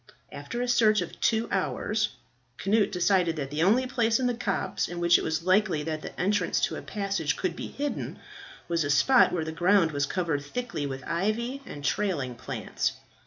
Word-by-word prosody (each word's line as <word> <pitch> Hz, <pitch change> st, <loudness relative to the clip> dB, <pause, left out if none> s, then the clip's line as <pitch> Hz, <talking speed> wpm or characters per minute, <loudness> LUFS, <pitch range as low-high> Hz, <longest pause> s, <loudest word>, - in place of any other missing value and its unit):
After 240 Hz, +1 st, -4 dB
a -, -, -2 dB
search 220 Hz, -3 st, +4 dB
of -, -, -7 dB
two 225 Hz, 0 st, +2 dB
hours, 210 Hz, +2 st, 0 dB, 0.5 s
Cnut 210 Hz, +2 st, +2 dB
decided 180 Hz, -2 st, +2 dB
that 140 Hz, -3 st, -4 dB
the 150 Hz, +2 st, -1 dB
only 225 Hz, +9 st, +4 dB
place 230 Hz, -3 st, +1 dB
in 255 Hz, -, 0 dB
the 245 Hz, -, +2 dB
copse 215 Hz, -4 st, -2 dB
in 175 Hz, 0 st, -6 dB
which 175 Hz, 0 st, +5 dB
it -, -, -4 dB
was 160 Hz, +1 st, -1 dB
likely 185 Hz, -4 st, +2 dB
that 155 Hz, 0 st, -3 dB
the -, -, -9 dB
entrance 195 Hz, -2 st, +1 dB
to -, -, 0 dB
a -, -, -6 dB
passage 195 Hz, -6 st, -2 dB
could 180 Hz, -3 st, -2 dB
be -, -, -5 dB
hidden, 290 Hz, +1 st, -4 dB, 0.5 s
was 170 Hz, -2 st, +1 dB
a 145 Hz, -, -2 dB
spot 255 Hz, -, +5 dB
where 165 Hz, -3 st, -1 dB
the 160 Hz, -, -4 dB
ground 175 Hz, +1 st, +3 dB
was 145 Hz, -1 st, 0 dB
covered 165 Hz, -5 st, -1 dB
thickly 155 Hz, -3 st, -4 dB
with 135 Hz, -1 st, -6 dB
ivy 225 Hz, +9 st, -1 dB
and 145 Hz, -1 st, -7 dB
trailing 170 Hz, -12 st, 0 dB
plants. 120 Hz, -, -3 dB
185 Hz, 195 wpm, -27 LUFS, 160-220 Hz, 0.5 s, which